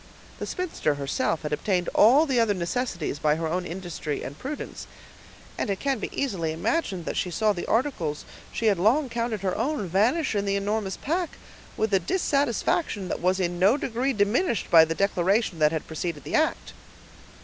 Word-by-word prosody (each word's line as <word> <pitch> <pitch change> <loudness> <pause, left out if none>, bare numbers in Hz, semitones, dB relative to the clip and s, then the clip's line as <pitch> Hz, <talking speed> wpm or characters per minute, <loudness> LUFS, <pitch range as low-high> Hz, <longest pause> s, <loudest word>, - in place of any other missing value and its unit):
The - - -4
spinster 330 - -1
herself 145 +3 -1
had 150 0 -3
obtained 180 +3 0
all 265 +9 +6
the 265 -5 +1
other 220 -3 +2
necessaries 175 - -2
by 150 -1 +2
her 165 +1 -3
own 180 +3 -2
industry 170 -4 -4
and 140 - -6
prudence, 280 - -6 0.7
and - - -1
it 195 - -1
can 270 -6 -1
easily 190 - -2
be - - -2
imagined 185 - -1
that - - -3
she 180 - -1
saw 210 +5 +1
the 175 - -5
articles 220 - -1 0.3
she 230 - -3
had 200 -5 +3
long 250 - +3
counted 230 -3 -2
her 190 -2 -1
own 245 -3 -1
vanish 225 - +2
in 200 -1 0
the 200 0 0
enormous 200 0 -1
pack, 340 +3 -2 0.4
with 220 -1 0
a 195 - +5
dissatisfaction 245 - 0
that - - -3
was 185 +2 +2
in 175 -1 -1
no 200 +9 +5
degree 260 0 -1
diminished 220 - +1
by 160 -1 +9
the 165 +1 -3
declaration 195 0 +1
that 150 0 +4
had 160 -1 -3
preceded 160 -2 -4
the - - -7
act. - - 0
200 Hz, 185 wpm, -26 LUFS, 170-240 Hz, 0.7 s, by